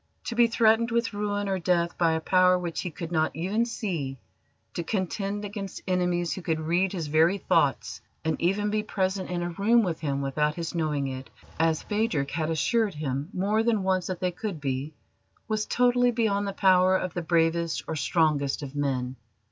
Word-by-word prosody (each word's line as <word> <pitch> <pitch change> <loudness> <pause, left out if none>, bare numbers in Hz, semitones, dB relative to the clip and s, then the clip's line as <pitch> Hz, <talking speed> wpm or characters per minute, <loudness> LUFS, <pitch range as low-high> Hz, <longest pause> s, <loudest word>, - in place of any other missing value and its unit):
To 235 - -4
be 235 0 +5
threatened 225 0 +3
with 235 -1 0
ruin 205 0 -2
or 190 -1 0
death 170 -1 +1
by 165 -2 +2
a 160 - 0
power 185 +2 +4
which 175 -2 -3
he 180 - -3
could 165 +1 -7
not 160 -2 +1
even 195 +8 0
see, 170 - -3 0.6
to - - -2
contend 200 +2 -2
against 200 -2 -6
enemies 180 -2 0
who 190 - -6
could 160 -2 -1
read 175 +4 +1
his 175 -5 -3
very 160 +6 +3
thoughts, - - +1 0.2
and 160 -1 +1
even 205 +4 +1
be 215 0 +1
present 190 -2 -2
in 175 -1 -2
a 175 - -3
room 225 +6 +3
with 170 -5 -2
him 140 -3 -2
without 150 +2 0
his 170 -1 -4
knowing 155 -4 -1
it 130 -1 -6 0.3
as 160 -1 +2
Phadrig 205 -10 -1
had 155 0 -1
assured 200 - +1
him 145 0 -3
more 205 +4 +1
than 225 -3 +1
once 185 -1 +1
that 185 -2 -4
they 180 -1 +1
could 190 -2 -5
be 140 +2 -3 0.5
was 215 -2 -1
totally 245 0 +3
beyond 215 -4 0
the 200 - -3
power 185 -1 +4
of 185 -2 -4
the 175 - -2
bravest 165 0 +1
or 160 - -3
strongest 150 -1 +1
of 140 0 -7
men. 130 -3 -1
180 Hz, 195 wpm, -27 LUFS, 160-205 Hz, 0.6 s, be